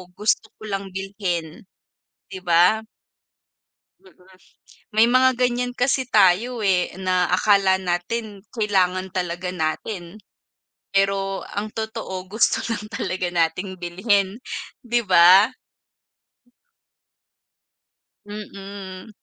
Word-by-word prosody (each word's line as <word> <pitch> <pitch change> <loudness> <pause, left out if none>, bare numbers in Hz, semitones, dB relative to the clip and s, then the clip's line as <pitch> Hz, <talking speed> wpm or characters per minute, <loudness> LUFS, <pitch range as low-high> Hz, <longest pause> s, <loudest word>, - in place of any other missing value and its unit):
gusto 215 +2 0
ko - - -13
lang 195 -1 -4
bilhin?" 185 -4 -4 0.7
'Di 190 - -6
ba? 180 +5 +4 1.2
Mm, 385 - -21 0.8
may 220 +1 +6
mga 255 +2 +5
ganyan 245 0 0
kasi 260 0 +1
tayo, 215 +4 +3
eh, 185 -2 +2
na 185 -1 +1
akala 190 0 +3
natin 195 +4 -3
kailangan 190 -5 0
talaga 180 0 -3
natin. 175 +3 -4 0.8
Pero 195 0 0
ang 210 +1 -4
totoo 220 -4 -5
gusto 220 +3 +2 0.2
lang 210 -1 -5
talaga 185 -3 -3
nating 175 +3 -1
bilhin, 190 +4 0 0.4
'di 240 0 0
ba? 185 +5 +7 2.7
Mm, 200 -2 -9
195 Hz, 95 wpm, -22 LUFS, 180-215 Hz, 2.7 s, ba